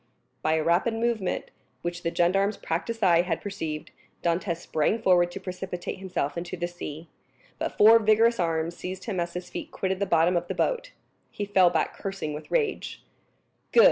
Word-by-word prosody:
By 155 - +2
a 160 -1 +1
rapid 180 +8 +2
movement, 225 -4 -1 0.3
which 175 0 -3
the 170 - 0
gendarme's 195 +5 +2
practiced 215 +7 -3
eye 170 -3 +6
had 175 -2 -2
perceived, 160 -7 -5 0.3
Dantès 170 0 0
sprang 170 +5 0
forward 180 -4 +4
to 185 - -7
precipitate 185 -1 -5
himself 180 -7 -2
into 175 +1 -6
the 175 0 -1
sea; 165 -2 -8 0.5
but - - -3
four 225 +2 +8
vigorous 225 +2 +4
arms 165 -1 0
seized 185 +1 -6
him 200 -6 -3
as 170 0 -2
his 180 0 -6
feet - - -5
quitted 190 0 -2
the 200 - 0
bottom 170 +2 +3
of 175 0 0
the - - -3
boat. - - 0 0.4
He 205 - -4
fell 190 -3 +5
back 170 - 0
cursing 195 -6 -4
with 150 - -8
rage. 445 -5 -1 0.7
"Good!" - - +5
180 Hz, 180 wpm, -27 LUFS, 170-205 Hz, 0.7 s, four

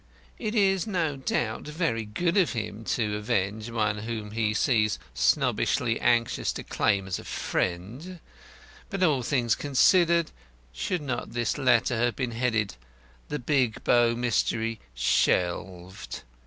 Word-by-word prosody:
It 215 +2 -3
is, 195 -1 +2
no 170 -8 0
doubt, 120 -4 -2
very 150 -8 -1
good 170 +12 -1
of 185 -8 +3
him 110 -1 -4
to 120 - 0
undertake 105 - -1
to 105 - -1
avenge 105 0 -1
one 110 -2 0
whom 110 -1 -5
he 110 -1 0
seems 110 -1 +2 0.2
snobbishly - - +1
anxious 115 -1 +2
to - - -6
claim 95 -1 +1
as 95 - -3
a - - -9
friend; 120 - -3 0.7
but, 195 -2 -1
all 150 -7 +3
things 120 -2 +1
considered, 170 +4 +3 0.4
should 160 - -2
not 130 -3 -4
his 120 -1 0
letter 130 -2 +3
have 120 0 +1
been 125 -3 -2
headed 115 - -1 0.5
'The 150 - -2
Big 130 -4 0
Bow 120 -1 +4
Mystery 115 -1 0 0.2
Shelved'? 90 +7 -1
120 Hz, 140 wpm, -27 LUFS, 105-145 Hz, 0.7 s, Bow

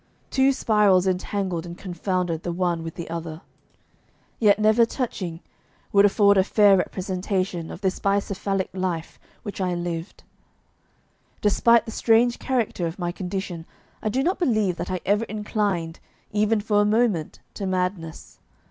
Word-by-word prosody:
Two 265 0 +4
spirals 210 -7 +3
entangled 185 -2 -1
and 175 0 -8
confounded 180 -2 -2
the 175 - -3
one 175 -1 -1
with 165 0 -7
the 170 - -6
other, 165 -1 -6 1.0
yet 210 -3 +5
never 215 +2 +4
touching, 195 -9 -3 0.5
would 200 0 +6
afford 200 0 +4
a - - +5
fair 205 0 +5
representation 185 -2 -2
of 175 - -9
this 190 -2 -1
bicephalic 200 -1 -1
life 180 -4 -3 0.2
which 200 -2 -6
I 180 -1 0
lived. 175 0 -5 1.2
Despite 230 +2 +4
the 225 - -6
strange 235 +2 +3
character 235 -9 -1
of 165 - -6
my 175 -2 -2
condition, 180 -2 -5 0.3
I 215 - -1
do 260 +5 0
not 365 +5 0
believe 215 - +1
that - - -4
I 185 -1 -2
ever 205 +4 +2
inclined, 205 -6 -2 0.3
even 210 +1 +2
for 205 -1 +2
a - - +3
moment, 210 -7 +1 0.2
to 195 - -4
madness. 180 -3 -3
195 Hz, 150 wpm, -24 LUFS, 175-210 Hz, 1.2 s, would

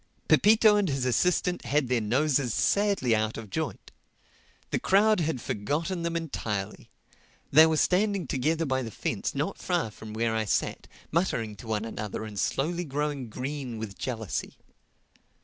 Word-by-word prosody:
Pepito 215 0 +6
and 200 -4 +1
his 135 -2 -1
assistant 180 +7 +1
had 145 -1 +1
their 125 -2 +1
noses 130 +2 +1
sadly 200 - +2
out 110 0 -1
of 110 -3 -8
joint. - - -4 0.8
The - - +1
crowd 210 +2 +4
had 160 -5 -1
forgotten 150 - -2
them 170 0 -2
entirely. 110 -12 -4 0.6
They 155 +3 +8
were 160 -1 +1
standing 195 +2 +2
together 155 +6 0
by 130 -2 0
the 115 - -5
fence - - -3
not - - -2
far 110 - -1
from 110 +1 -10
where 115 0 0
I 110 -1 0
sat, - - -1 0.2
muttering 115 - 0
to 115 - -11
one 110 0 -1
another 105 -1 -5
and 105 -2 -6
slowly 170 - 0
growing 145 -4 -3
green 130 0 -5
with 110 -3 -6
jealousy. 110 -5 -4
135 Hz, 155 wpm, -28 LUFS, 110-170 Hz, 0.8 s, They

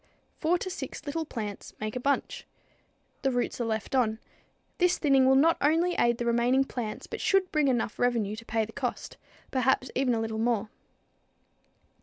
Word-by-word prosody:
Four 340 +3 +2
to 370 - -5
six 310 - -6
little 320 +2 -2
plants 210 -8 -6
make 215 +1 -4
a - - -1
bunch. 280 +3 -1 0.7
The 270 - +2
roots 245 -1 -1
are - - 0
left 220 +1 -3
on. 230 -4 +2 0.6
This 360 0 +3
thinning 270 -3 +4
will 265 - +5
not 330 +5 +4
only 330 +5 +3
aid 235 -6 +2
the 240 - -3
remaining 240 +3 +3
plants, 240 -5 -5
but - - -6
should 385 -2 +2
bring 305 -2 +2
enough 240 -5 0
revenue 230 -4 +1
to 230 - -8
pay 225 -1 0
the 220 - -12
cost, 255 -4 -4 0.3
perhaps 260 -1 +1
even 255 -2 +2
a - - -1
little 220 0 -3
more. 225 -2 0
250 Hz, 180 wpm, -28 LUFS, 225-285 Hz, 0.7 s, will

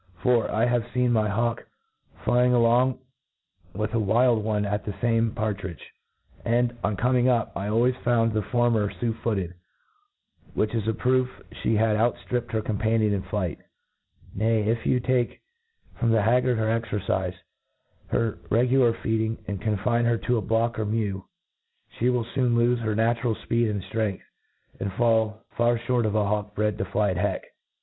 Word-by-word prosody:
For, 120 -2 +3
I 110 +2 +1
have 120 -1 +2
feen 125 -1 +2
my 110 -2 +2
hawk 115 +3 -1 0.6
flying 125 0 +3
along 120 +2 +3 0.8
with 105 +2 -2
a 115 - +2
wild 110 +2 +3
one 105 -1 0
at 100 0 -2
the 105 - -4
fame 115 +2 +1
par 110 -2 -1
tridge 90 -4 -7
J - - -14 0.6
and, 120 +1 +1
on 100 -1 0
con[>ing 125 +2 +2
up, 120 -3 +2
I 100 - -3
always 120 +4 +2
found 115 -2 +1
the 110 - +1
former 115 -2 +1
fu^ 110 +5 -2
footed, 95 -6 -1 1.0
which 110 +1 0
id 110 -2 -1
a 110 - +2
proof 130 +2 +2 0.3
Ihe 110 - +2
had 110 -1 +2
out 115 +2 +2
ftripped 120 -1 -2
her 110 -1 -1
companion 110 0 +1
in 100 - -1
flight* 95 -3 -3 0.7
Nay, 110 +1 +1
if 115 +2 -1
you 125 - +3
take 125 0 0 0.6
from 115 - +2
the 110 -2 +3
haggard 125 +2 +3
her 110 - 0 0.2
excrcife, 95 -4 -2 0.7
her 115 -2 -1
regular 125 +1 +3
feeding, 110 0 0
and 100 -2 -4
confine 115 +3 0
her 115 0 +2
to 120 +2 0
a - - 0
block 115 +3 0
or 110 - 0
mew, 105 -3 -2 0.7
flic 125 +2 +3
will 125 -2 0
foon 125 -3 +2
lofe 120 +1 +3
her 110 -2 -1
n^itural 115 +1 +1
fpeed 115 -1 +1
and 100 -3 -3
ftrength, 110 -4 -2 0.6
and 100 - -2
M 95 - -14
far 110 -2 +2 0.4
fhoTt 120 -1 0
of 105 - -2
a 105 -1 +2
hawk 105 0 -2
bred 105 0 0
to 95 - -1
fly 100 +1 0
at 90 - -3
heck. - - -1
115 Hz, 175 wpm, -25 LUFS, 105-120 Hz, 1.0 s, For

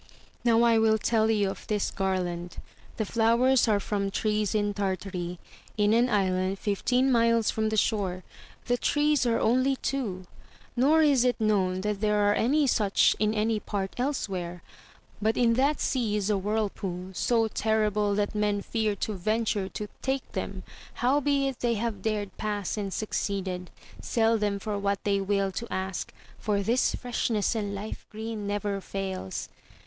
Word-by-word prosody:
Now 235 -1 +4
I 230 -1 +5
will 220 0 +4
tell 220 0 +2
you 205 -3 +2
of - - -11
this 210 -2 0
garland: 180 -3 -2 0.4
the 220 - -1
flowers 235 +4 +3
are 210 -2 +3
from 200 0 -2
trees 210 +1 0
in 205 -1 +1
Tartary, 185 -3 -3 0.4
in 210 0 +3
an 240 +2 +3
island 190 -2 +1
fifteen 250 +7 +1
xniles 230 -2 +3
fron. 220 0 0
the 220 - -1
shore; 195 -4 0 0.4
the 245 0 0
treJaxe 295 -3 +2
only 255 +4 +2
two, 220 -10 -3 0.5
nor 295 +6 +4
is 280 -5 +4
it 250 -1 +1
known 190 -4 +1
that 210 0 -2
there 210 -1 +2
are 205 0 +3
any 280 +8 +2
such 210 -6 +3
in 215 0 +1
any 215 +1 +1
part 195 -2 -3
elsewhere; 185 -10 -2 0.6
but 220 +2 +1
in 235 -2 +4
that 275 +4 +2
sea 230 -5 0
is 210 0 0
a - - +3
whirlpool, 195 -3 -3
so 225 +3 +2
terrible 210 -2 +1
that 205 +1 0
men 210 -1 0
fear 220 -3 -1
to 215 +2 -3
venture 210 0 -1
to 210 - -5
take 265 0 -2
them, - - -4 0.3
howbeit 275 0 +1
they 235 -1 +1
that - - -3
have 225 -4 -3
dared 210 -1 -2
pass 205 -3 -2
and 200 -2 -3
succeeded, 190 -3 -3 0.3
sell 225 -1 +2
them 205 -1 0
for 205 0 -3
what 200 0 -1
they 200 -1 +1
will 195 0 0
to 235 +5 -6
ask, 190 0 -3 0.3
for 205 -2 0
this 235 +5 +2
freshness 235 -4 -1
and 205 -3 -2
life 205 +2 -7
green 220 -1 -5
never 205 -1 -2
fails. 190 - -4
210 Hz, 165 wpm, -27 LUFS, 200-230 Hz, 0.6 s, I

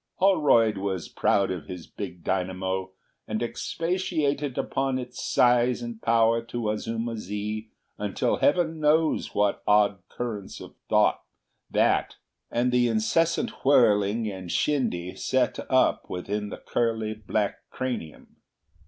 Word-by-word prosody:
Holroyd 145 - +4
was 95 -3 -3
proud 100 -1 +1
of 90 -5 -5
his 90 -3 -7
big 90 -4 -8
dynamo, 95 0 -2 0.4
and 110 +2 -2
expatiated 155 -1 -1
upon 135 -1 -1
its 125 -1 -6
size 120 0 +3
and 120 -1 -7
power 115 0 +3
to 115 -2 -3
Azuma 115 +2 -3
zi 105 +2 -4 0.3
until 105 -1 0
heaven 160 +1 +2
knows 155 +1 +2
what 105 -1 +1
odd 105 -1 +4
currents 110 -5 -5
of - - -11 0.2
thought - - +3 0.5
that - - +2 0.3
and 125 +1 +1
the 125 -1 +3
incessant 120 +10 0
whirling 110 -5 +4
and 95 -4 -6
shindy 90 -12 0
set - - 0
up - - +2
within 105 +3 -3
the - - -6
curly 110 -2 -1
black 105 -1 -3
cranium. 120 -12 -5
115 Hz, 125 wpm, -26 LUFS, 100-125 Hz, 0.5 s, Holroyd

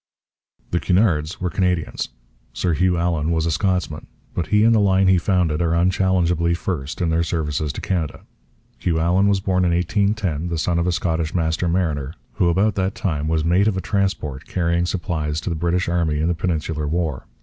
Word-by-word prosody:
The 85 - +1
Cunards 90 -5 +1
were 90 -2 -2
Canadians. 90 -4 -1 0.4
Sir 90 - 0
Hugh 90 +2 +2
Allan 85 -2 0
was 80 -1 +1
a 85 - +1
Scotsman. 90 -2 -1 0.3
But 85 - -2
he 105 0 +3
and 115 +1 +5
the 110 - +4
line 95 -1 +3
he 95 -1 +5
founded 85 -3 +1
are 85 -1 +1
unchallengeably 90 -1 +2
first 75 -6 -4
in 85 -2 +1
their 80 +1 +2
services 75 -3 -1
to - - -6
Canada. 85 -6 -2 0.6
Hugh 85 -2 0
Allan 90 +5 +3
was 100 -1 +2
born 95 -1 +1
in 90 - +3
1810, 90 -2 0
the 85 - -2
son 85 +2 0
of 85 - 0
a - - +2
Scottish 80 -2 -1
master 80 +1 0
mariner 80 -5 -1 0.2
who 85 - +3
about 100 +5 +2
that 95 0 -1
time 75 -5 -2
was 80 0 0
mate 90 +5 +3
of 100 -3 +1
a - - +1
transport 95 -9 -2
carrying 85 -1 0
supplies 80 -5 -2
to - - -3
the - - -1
British 85 +3 0
Army 85 -3 0
in 80 - +1
the 85 - +2
Peninsular 80 -3 -2
War. 80 -3 -2
85 Hz, 195 wpm, -21 LUFS, 80-95 Hz, 0.6 s, and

